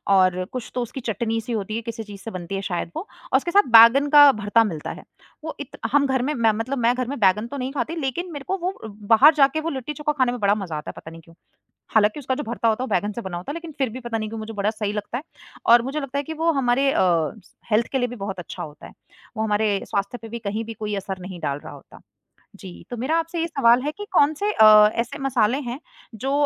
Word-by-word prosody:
और 185 -1 +3
कुछ 255 -2 -6
तो 250 - 0
उसकी 240 +3 -5
चटनी-सी 225 +1 -2
होती 215 0 -3
है, 230 - -2
किसी 230 -1 -6
चीज़ 205 -2 -11
से 225 - -7
बनती 185 0 -6
है 195 - -2
शायद 175 -3 -3
वो - - -2 0.3
और - - +7
उसके 345 - -3
साथ 405 +2 +4
बैंगन 235 +5 +8
का 290 -1 +9
भरता 215 0 +2
मिलता 165 -8 -4
है। - - -10 0.4
वो 315 - -5
इत 285 - -8
हम 280 +1 +4
घर 265 -1 +1
में, 290 +4 -1
मैं 230 -4 +3
मतलब 225 +6 -3
मैं 240 0 +3
घर 255 -1 -2
में 280 +3 -4
बैंगन 210 +3 +3
तो 285 - -7
नहीं 260 0 -3
खाती, 305 +3 -2
लेकिन 330 +4 -3
मेरे 285 -3 -7
को 385 - -1
वो 365 +1 -2
बाहर 220 +8 +4
जाके 285 +1 +3
वो 330 - -2
लिट्टी 270 +1 -5
चोखा 300 +1 -1
खाने 255 -2 +2
में 245 - -5
बड़ा 200 0 +3
मज़ा 190 -7 -5
आता 150 - -7
है, - - -6
पता 160 - -10
नहीं 165 - -12
क्यों? 165 +1 -20 0.6
हालाँकि 215 +5 +3
उसका 260 -1 -2
जो 295 - -4
भरता 230 0 -2
होता 225 +3 +1
है, - - -1
वो - - -8
बैंगन 205 +4 0
से 235 - -5
बना 190 -5 -5
होता 180 +10 -6
है, - - -5
लेकिन 335 0 -7
फिर 270 -3 0
भी 245 +4 -7
पता 240 -2 -4
नहीं 215 -1 -4
क्यों 225 - -6
मुझे 220 +1 -7
बड़ा 205 0 0
सही 210 -2 -3
लगता 210 +3 -4
है 275 - -7 0.5
और 235 0 +8
मुझे 270 +5 -3
लगता 275 -1 -5
है 285 - -1
कि 320 - -6
वो 325 +1 +1
हमारे 270 -1 +2
अ, - - +1
स 175 +2 -1 0.2
हेल्थ 220 +2 +3
के 265 - +1
लिए 245 - 0
भी 245 - -8
बहुत 195 -3 -5
अच्छा 175 - -7
होता 150 -1 -11
है। - - -15 0.5
वो 220 - 0
हमारे 210 -2 +1
स्वास्थ्य 200 +3 -2
पे 225 - -8
भी 235 - -6
कहीं 215 0 -3
भी 225 - -7
कोई 210 -1 -4
असर 195 -1 -5
नहीं 180 -1 -8
डाल 140 -3 -3
रहा - - -9
होता। - - -15 0.6
जी, 190 -3 -11
तो 245 - -4
मेरा 265 +8 0
आपसे 330 +1 -3
ये 330 - 0
सवाल 255 -6 +3
है 295 +2 -2
कि 415 - -5
कौन 310 -4 +4
से 410 +7 -1
अ, 215 - +8
ऐसे 240 +5 -3
मसाले 255 -3 +1
हैं 245 - -5 0.4
जो 265 +5 -3
230 Hz, 275 wpm, -23 LUFS, 210-275 Hz, 0.6 s, का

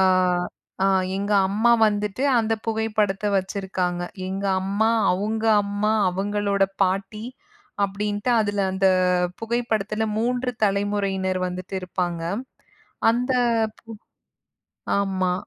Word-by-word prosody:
ஆ, - - +5 0.8
ஆ, - - +4 0.3
எங்க 200 +1 -1 0.2
அம்மா 220 +4 +2 0.2
வந்துட்டு 210 +3 -1 0.2
அந்தப் 225 -1 -1
புகைப்படத்த 215 -2 0
வச்சிருக்காங்க. 185 -2 -2 0.3
எங்க 195 +1 -4 0.2
அம்மா, 200 +4 +1 0.2
அவுங்க 215 +4 -2 0.2
அம்மா, 205 +1 0 0.2
அவுங்களோட 200 +1 0 0.2
பாட்டி 195 +3 -2 0.6
அப்டின்ட்டு 205 +3 -2
அதுல 205 -1 0
அந்தப் 185 -2 +2
புகைப்படத்துல 220 -2 -1
3 250 +2 0
தலைமுறையினர் 195 -2 0
வந்துட்டு 180 +1 -6
இருப்பாங்க. 175 -2 -3 0.9
அந்த 250 +2 -1 0.5
பு - - -34 1.2
ஆமா. 190 -2 0
200 Hz, 95 wpm, -23 LUFS, 190-215 Hz, 1.2 s, ஆ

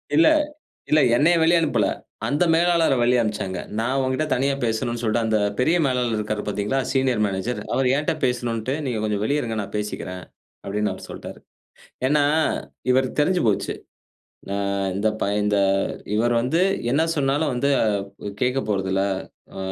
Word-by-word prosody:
இல்ல. 325 0 +6 0.6
இல்ல. 155 - +5 0.2
என்னைய 165 +6 +4
வெளிய 170 +2 +5
அனுப்பல. 115 -10 +1 0.4
அந்த 145 +5 +2
மேலாளர 170 -2 +3
வெளிய 120 +1 +3
அனுப்பிச்சாங்க. 105 -4 -3 0.2
நான் 125 +4 0
உன்கிட்ட 130 +3 0
தனியா 135 +2 +1
பேசணுன்னு 115 +1 -1
சொல்ட்டு, 115 0 +1
அந்த 110 -1 +2 0.2
பெரிய 160 +7 +3
மேலாளர் 125 -3 0
இருக்காரு 105 0 -2
பார்தீங்களா! 105 +5 -1
Senior 130 -5 +1
manager. 100 +5 -3
அவரு 130 -1 +2
என்ட்ட 150 - 0
பேசணுன்ட்டு, 120 -1 -1
நீங்க 125 -5 -2
கொஞ்சம் 105 -1 -1
வெளிய 145 +6 +1
இருங்க, 115 -4 -3
நான் 100 - -7
பேசிக்கிறேன், 95 -3 -5 0.4
அப்பிடின்னு 105 +1 -1
அவர் - - -9
சொல்ட்டாரு. - - -8 0.7
ஏன்னா, 145 +1 +3 0.7
இவருக்கு 130 +3 +1
தெரிஞ்சு 180 +4 +1
போச்சு. 105 - 0 0.8
ஆ - - -1 0.4
இந்த 105 +2 +1
பைய 100 +1 0
இந்த 105 -1 +2 0.6
இவரு 120 +3 +2
வந்து 130 +8 +1 0.3
என்ன 145 +5 +3
சொன்னாலும் 145 +1 +1
வந்து 125 +3 0
அ - - +2 0.5
கேட்கப் 125 0 0
போறதில்ல. 95 -1 0 0.5
அ, - - -6
125 Hz, 150 wpm, -23 LUFS, 105-140 Hz, 0.8 s, இல்ல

